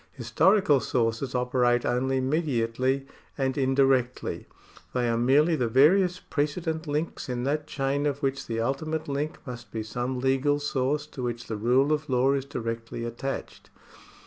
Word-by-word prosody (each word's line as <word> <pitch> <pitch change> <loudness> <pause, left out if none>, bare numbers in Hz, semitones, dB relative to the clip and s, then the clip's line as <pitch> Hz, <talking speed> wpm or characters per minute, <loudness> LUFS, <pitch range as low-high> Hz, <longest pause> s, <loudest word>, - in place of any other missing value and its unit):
Historical 145 - +3
sources 120 +1 -1
operate 125 -1 +2
only 130 +2 +1
mediately 130 -2 0 0.3
and 135 -2 0
indirectly. 135 -2 +1 0.5
They 125 -1 +1
are 115 - +1
merely 140 +8 +4
the 125 -6 0
various 175 - +4
precedent 160 +2 -2
links 150 -1 -3
in 125 -1 -2
that 145 +3 -1
chain 140 +1 -1
of 140 0 -3
which 135 0 -1
the 115 0 -2
ultimate 155 +6 -2
link 145 +2 -2
must 120 -4 -8
be 110 - -3
some 125 +4 -3
legal 135 +3 +2
source 145 +1 -1
to 145 -3 -9
which 120 -1 -3
the 110 - -4
rule 125 +7 +3
of 150 0 -3
law 130 +2 +3
is 135 -1 -1
directly 115 -3 -5
attached. 120 +4 -5
135 Hz, 150 wpm, -27 LUFS, 120-145 Hz, 0.5 s, merely